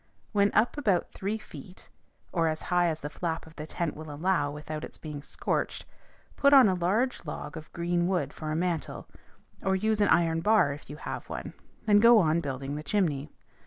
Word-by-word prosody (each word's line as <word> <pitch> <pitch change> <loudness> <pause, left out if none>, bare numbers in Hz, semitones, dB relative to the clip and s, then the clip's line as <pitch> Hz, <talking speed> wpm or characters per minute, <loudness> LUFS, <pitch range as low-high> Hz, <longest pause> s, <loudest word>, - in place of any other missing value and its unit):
When 200 -1 +3
up 235 +6 +3
about 200 -10 +1
three 205 +3 -3
feet, 190 -3 -12 0.4
or 165 -2 +1
as 155 0 -2
high 175 0 +4
as 160 -1 -2
the 145 - -4
flap 165 0 -3
of 160 0 -16
the 150 0 -7
tent 170 -1 -3
will 155 0 -8
allow 150 -1 +1
without 150 +1 -6
its - - -8
being 150 -2 -7
scorched, - - -3 0.5
put 280 0 +4
on 265 -5 +9
a 190 - +3
large 205 +9 0
log 150 -1 -6
of 155 -1 -9
green 175 0 0
wood 165 -7 -1
for 155 -1 -5
a - - -1
mantle, 170 -1 -2 0.5
or 190 0 +1
use 215 +2 +1
an 205 - +4
iron 165 -1 +3
bar 200 -7 +4
if 145 - -12
you 145 - -6
have - - -6
one, - - -6 0.3
and 205 -1 +5
go 235 +1 +8
on 165 -4 +3
building 140 -2 -4
the 150 - -4
chimney. 155 -6 0
170 Hz, 200 wpm, -28 LUFS, 155-200 Hz, 0.5 s, on